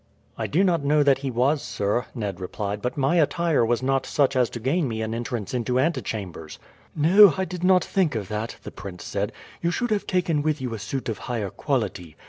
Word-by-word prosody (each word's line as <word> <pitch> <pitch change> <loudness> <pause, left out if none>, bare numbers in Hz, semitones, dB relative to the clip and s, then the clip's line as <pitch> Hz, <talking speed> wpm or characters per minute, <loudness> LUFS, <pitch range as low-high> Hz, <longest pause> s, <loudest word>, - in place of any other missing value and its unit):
"I - - -3
do 175 +6 +2
not 170 -6 +2
know 145 +1 +3
that 140 -2 +4
he 135 -1 -3
was, 130 +5 +1
sir," 105 +5 -1
Ned 100 -6 -4
replied; 100 +2 -4
"but 125 +5 -3
my 140 +5 +2
attire 165 -2 +2
was 120 +2 +1
not 135 0 +1
such 140 -2 +2
as 125 -2 +3
to 120 - -6
gain 140 +7 +1
me 110 -2 -3
an 110 0 -3
entrance 115 -2 -4
into 125 0 0
antechambers." 110 - -3 0.4
"No, 180 +5 +7
I 190 - 0
did 180 0 -6
not 180 -1 +5
think 180 -9 +1
of 105 -4 -3
that," 110 +3 -4
the - - -7
prince 95 -3 -9
said. - - -2 0.3
"You 170 - +1
should 240 +6 -1
have 210 -2 0
taken 175 -5 +1
with 155 0 0
you 125 -3 -4
a 110 - -5
suit 135 +6 -4
of 110 -4 -3
higher 110 -6 -3
quality. 105 - -2
130 Hz, 220 wpm, -24 LUFS, 110-160 Hz, 0.4 s, No